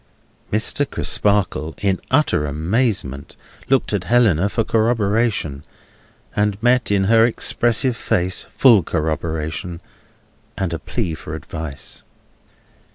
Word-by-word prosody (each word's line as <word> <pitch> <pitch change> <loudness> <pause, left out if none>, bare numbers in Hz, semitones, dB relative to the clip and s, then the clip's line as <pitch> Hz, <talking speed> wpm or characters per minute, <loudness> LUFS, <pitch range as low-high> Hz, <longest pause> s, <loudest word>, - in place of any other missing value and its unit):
Mr. 110 +6 +1
Crisparkle, 100 -6 0
in 95 -2 -1
utter 130 - +2
amazement, 80 - -1 0.3
looked 135 -4 +2
at 95 -3 -1
Helena 105 -7 +3
for 115 - 0
corroboration, 110 - 0 0.7
and 105 -1 +1
met 125 +1 +3
in 100 -1 +2
her 115 +3 +5
expressive 120 +1 +2
face 90 -5 -1
full 120 -7 +6
corroboration, 80 +2 -3 0.8
and 90 -3 -2
a 85 - -3
plea 90 0 -3
for 80 0 -7
advice. 80 -4 -6
100 Hz, 105 wpm, -20 LUFS, 80-115 Hz, 0.8 s, full